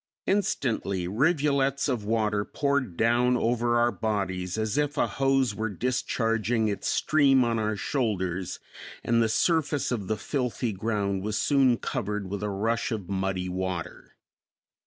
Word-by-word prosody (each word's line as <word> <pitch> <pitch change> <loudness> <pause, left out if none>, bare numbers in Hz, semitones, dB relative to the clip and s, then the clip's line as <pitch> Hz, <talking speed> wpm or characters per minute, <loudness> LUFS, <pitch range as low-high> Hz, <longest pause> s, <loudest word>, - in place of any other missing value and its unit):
Instantly 115 - 0
rivulets 140 - +1
of 125 -6 -1
water 105 -1 0
poured 140 - -1
down 120 +2 +3
over 120 0 +1
our 120 0 +3
bodies 95 -2 -2
as 110 +1 -1
if 145 -1 0
a - - +3
hose 135 -3 +1
were 110 +2 -2
discharging 115 0 0
its 100 -1 -2
stream 140 -4 +3
on 115 -1 0
our 110 0 0
shoulders, 95 - -2 0.4
and 115 0 +2
the 115 - +2
surface 150 +2 +1
of 105 -6 -2
the 110 - -1
filthy 125 -1 -2
ground 100 -1 -1
was 105 +2 -2
soon 135 -4 +3
covered 105 -6 -3
with 100 0 -3
a 105 - -2
rush 115 +5 -1
of 105 -5 -4
muddy 95 -1 -1
water. 90 -1 -5
115 Hz, 145 wpm, -27 LUFS, 100-130 Hz, 0.4 s, down